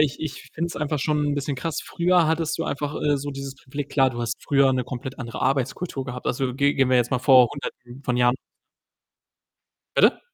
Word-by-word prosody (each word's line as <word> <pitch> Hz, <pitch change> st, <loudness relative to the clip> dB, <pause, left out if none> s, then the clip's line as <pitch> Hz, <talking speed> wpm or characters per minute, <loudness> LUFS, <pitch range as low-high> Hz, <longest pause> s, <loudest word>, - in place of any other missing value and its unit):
ich 145 Hz, -2 st, +1 dB
ich 155 Hz, -3 st, -5 dB
finde 165 Hz, +2 st, -1 dB
es -, -, -8 dB
einfach 150 Hz, -1 st, -1 dB
schon 150 Hz, +1 st, +1 dB
'n 145 Hz, -, 0 dB
bisschen 140 Hz, -1 st, -2 dB
krass. 165 Hz, +3 st, -3 dB
Früher 175 Hz, -1 st, +2 dB
hattest 160 Hz, -1 st, 0 dB
du 165 Hz, -, -2 dB
einfach, 145 Hz, +1 st, -3 dB
äh, 145 Hz, -1 st, +3 dB
so 145 Hz, +1 st, -4 dB
dieses 135 Hz, 0 st, -6 dB
Gefühl 140 Hz, +2 st, -6 dB
klar, 135 Hz, -2 st, +2 dB
du 120 Hz, -1 st, -6 dB
hast 120 Hz, 0 st, -1 dB
früher 140 Hz, -2 st, +4 dB
'ne 130 Hz, -2 st, 0 dB
komplett 130 Hz, +1 st, -6 dB
andere 120 Hz, -3 st, -5 dB
Arbeitskultur 135 Hz, +2 st, -1 dB
gehabt. 125 Hz, -1 st, -6 dB
Also, 125 Hz, 0 st, -1 dB
ge 140 Hz, +1 st, +3 dB
gehen 135 Hz, -1 st, +3 dB
wir 130 Hz, -, +5 dB
jetzt 120 Hz, -1 st, +2 dB
mal 130 Hz, -, +1 dB
vor 125 Hz, -2 st, +6 dB
Hunderten 125 Hz, -2 st, -8 dB
von 125 Hz, -, 0 dB
Jahren 125 Hz, +1 st, +3 dB, 1.6 s
Bitte? -, -, +5 dB
135 Hz, 215 wpm, -24 LUFS, 125-150 Hz, 1.6 s, vor